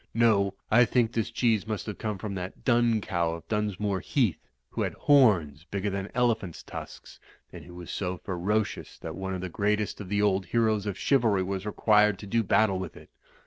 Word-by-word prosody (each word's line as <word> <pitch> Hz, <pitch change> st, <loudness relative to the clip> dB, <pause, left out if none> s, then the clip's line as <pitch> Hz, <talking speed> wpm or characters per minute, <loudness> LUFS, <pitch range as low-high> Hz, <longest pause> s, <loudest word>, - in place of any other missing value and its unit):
No, 100 Hz, -4 st, +3 dB, 0.2 s
I 120 Hz, +3 st, +7 dB
think 115 Hz, -2 st, +1 dB
this 115 Hz, -2 st, -1 dB
cheese 110 Hz, -4 st, +1 dB
must 110 Hz, -2 st, -3 dB
have 105 Hz, -3 st, -6 dB
come 105 Hz, -2 st, -3 dB
from 105 Hz, 0 st, -5 dB
that 90 Hz, -1 st, -7 dB
Dun 120 Hz, -3 st, +3 dB
Cow 85 Hz, -5 st, -1 dB
of 85 Hz, -, -12 dB
Dunsmore 105 Hz, -2 st, -1 dB
Heath, 110 Hz, -, 0 dB, 0.2 s
who -, -, -3 dB
had -, -, -2 dB
horns 90 Hz, -, +3 dB
bigger 100 Hz, +1 st, -2 dB
than 100 Hz, +1 st, -4 dB
elephant's 115 Hz, -8 st, 0 dB
tusks, -, -, -9 dB, 0.3 s
and -, -, -10 dB
who 90 Hz, 0 st, -12 dB
was 90 Hz, -1 st, -8 dB
so 90 Hz, -2 st, -3 dB
ferocious 100 Hz, +4 st, -2 dB
that 80 Hz, -, -7 dB
one 95 Hz, 0 st, -4 dB
of 90 Hz, -, -5 dB
the 95 Hz, -, -3 dB
greatest 105 Hz, +4 st, -1 dB
of 95 Hz, -, -8 dB
the 105 Hz, 0 st, 0 dB
old 100 Hz, -2 st, +1 dB
heroes 110 Hz, -1 st, +1 dB
of 100 Hz, -2 st, -3 dB
chivalry 115 Hz, -8 st, +2 dB
Ivas 95 Hz, +2 st, -4 dB
required 105 Hz, -1 st, +3 dB
to 105 Hz, -, -9 dB
do 115 Hz, +3 st, +1 dB
battle 100 Hz, -2 st, +2 dB
with 95 Hz, -3 st, -6 dB
it. -, -, -15 dB
105 Hz, 200 wpm, -27 LUFS, 95-110 Hz, 0.3 s, I